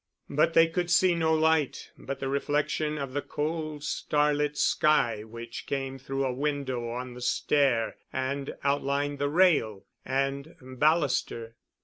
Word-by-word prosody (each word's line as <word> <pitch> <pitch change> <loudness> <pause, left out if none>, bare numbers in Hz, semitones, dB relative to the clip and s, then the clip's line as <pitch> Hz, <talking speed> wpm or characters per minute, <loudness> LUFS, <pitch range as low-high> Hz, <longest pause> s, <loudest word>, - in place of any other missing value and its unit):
But 155 +3 +2
they 165 - +8
could 175 +1 -2
see 175 +1 +4
no 165 -1 +1
light 160 -2 +1
but 135 0 -6
the 135 - -3
reflection 150 +2 0
of 140 -3 -5
the 145 - -1
cold 155 0 -4
starlit 150 0 0
sky 120 -11 +2
which 115 +1 -8
came 135 -1 -3
through 135 +1 -2
a 130 - -1
window 130 -3 -2
on 125 +1 -5
the 125 - -10
stair 125 -2 +1
and 135 +1 -3
outlined 140 0 0
the 145 0 0
rail 145 - +3 0.2
and 135 +4 -2
baluster. 130 -4 0
140 Hz, 140 wpm, -28 LUFS, 130-150 Hz, 0.2 s, they